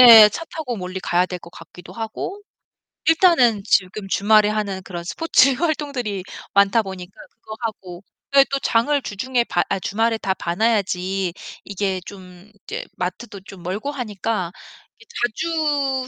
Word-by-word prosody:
예. 225 Hz, -4 st, +11 dB
차 330 Hz, +11 st, -6 dB
타고 275 Hz, -7 st, -4 dB
멀리 185 Hz, -1 st, -5 dB
가야 180 Hz, 0 st, +2 dB
될 180 Hz, -1 st, -5 dB
것 170 Hz, -, -13 dB
같기도 175 Hz, +1 st, -13 dB
하고 230 Hz, -, -5 dB, 0.7 s
일단은 325 Hz, -, +4 dB
지금 195 Hz, +1 st, +1 dB
주말에 210 Hz, +2 st, +4 dB
하는 205 Hz, -3 st, -2 dB
그런 175 Hz, -2 st, -6 dB
스포츠 275 Hz, -, +3 dB
활동들이 275 Hz, -, -2 dB, 0.3 s
많다 200 Hz, +3 st, +4 dB
보니까 190 Hz, -2 st, -8 dB, 0.2 s
그거 215 Hz, -, -11 dB
하고 185 Hz, -5 st, -6 dB, 0.3 s
왜 275 Hz, -1 st, +8 dB
또 275 Hz, -, +1 dB
장을 275 Hz, +6 st, +2 dB
주중에 245 Hz, +3 st, -1 dB
봐 -, -, 0 dB
아 195 Hz, -, 0 dB
주말에 225 Hz, +4 st, 0 dB
다 195 Hz, -3 st, -1 dB
봐 170 Hz, -2 st, -4 dB
놔야지 195 Hz, -4 st, 0 dB, 0.3 s
이게 195 Hz, -1 st, -2 dB
좀 185 Hz, -1 st, -12 dB
이제 -, -, -5 dB
마트도 195 Hz, +3 st, -5 dB
좀 195 Hz, -1 st, -12 dB
멀고 200 Hz, +10 st, -3 dB
하니까 215 Hz, -7 st, -3 dB, 0.5 s
이게 460 Hz, -, -18 dB, 0.2 s
자주 280 Hz, 0 st, -1 dB
210 Hz, 290 characters per minute, -21 LUFS, 190-250 Hz, 0.7 s, 예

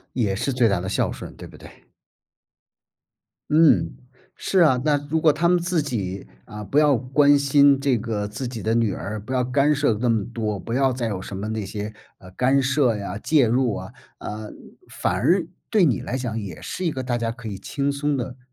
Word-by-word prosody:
也 105 Hz, -6 st, 0 dB
是 135 Hz, +6 st, -2 dB
最 120 Hz, -2 st, +3 dB
大 100 Hz, -3 st, +1 dB
的 95 Hz, -, -5 dB
孝 95 Hz, -, 0 dB
顺， -, -, -9 dB
对 -, -, -10 dB
不 -, -, -15 dB
对？ -, -, -13 dB, 1.8 s
嗯， 155 Hz, 0 st, +4 dB, 0.4 s
是 190 Hz, -, 0 dB
啊， 130 Hz, -6 st, +4 dB
那 150 Hz, -1 st, +3 dB
如 160 Hz, -, +1 dB
果 155 Hz, -, +6 dB
他 170 Hz, +3 st, +1 dB
们 180 Hz, -1 st, +4 dB
自 175 Hz, -1 st, 0 dB
己， 100 Hz, -9 st, -4 dB, 0.2 s
啊 105 Hz, 0 st, -8 dB
不 105 Hz, +9 st, +1 dB
要 150 Hz, -2 st, +4 dB
关 140 Hz, +4 st, +4 dB
心 140 Hz, 0 st, +5 dB
这 135 Hz, -3 st, +1 dB
个 110 Hz, -2 st, -3 dB
自 110 Hz, +5 st, -5 dB
己 120 Hz, -3 st, -6 dB
的 110 Hz, +1 st, +1 dB
女 115 Hz, -3 st, +1 dB
儿， 105 Hz, +2 st, -5 dB
不 110 Hz, +6 st, -7 dB
要 125 Hz, -1 st, +1 dB
干 140 Hz, +4 st, +2 dB
涉 145 Hz, -5 st, +2 dB
那 125 Hz, -, 0 dB
么 115 Hz, -3 st, +2 dB
多， 110 Hz, -3 st, -2 dB
不 115 Hz, -, -6 dB
要 135 Hz, 0 st, +2 dB
再 120 Hz, -2 st, -2 dB
有 100 Hz, -4 st, -3 dB
什 95 Hz, -, -7 dB
么 100 Hz, +3 st, -4 dB
那 110 Hz, -2 st, -3 dB
些， 105 Hz, +2 st, -5 dB, 0.3 s
呃， 90 Hz, -, -14 dB
干 130 Hz, +7 st, +2 dB
涉 130 Hz, -3 st, +2 dB
呀、 100 Hz, -2 st, -5 dB
介 145 Hz, +4 st, +3 dB
入 120 Hz, -2 st, +1 dB
啊， -, -, -7 dB, 0.3 s
啊， 105 Hz, 0 st, -6 dB, 0.4 s
反 -, -, -1 dB
而 165 Hz, -, +2 dB, 0.2 s
对 215 Hz, -4 st, +3 dB
你 130 Hz, -, +1 dB
来 125 Hz, -, -4 dB
讲 120 Hz, -3 st, -3 dB
也 95 Hz, -6 st, -8 dB
是 185 Hz, -, -5 dB
一 165 Hz, -, +1 dB
个 130 Hz, -3 st, -4 dB
大 120 Hz, -1 st, -1 dB
家 115 Hz, -1 st, -2 dB
可 115 Hz, -2 st, -8 dB
以 100 Hz, -, -6 dB
轻 140 Hz, +7 st, -2 dB
松 145 Hz, +1 st, -1 dB
地， 125 Hz, 0 st, -4 dB
125 Hz, 235 characters per minute, -23 LUFS, 105-140 Hz, 1.8 s, 果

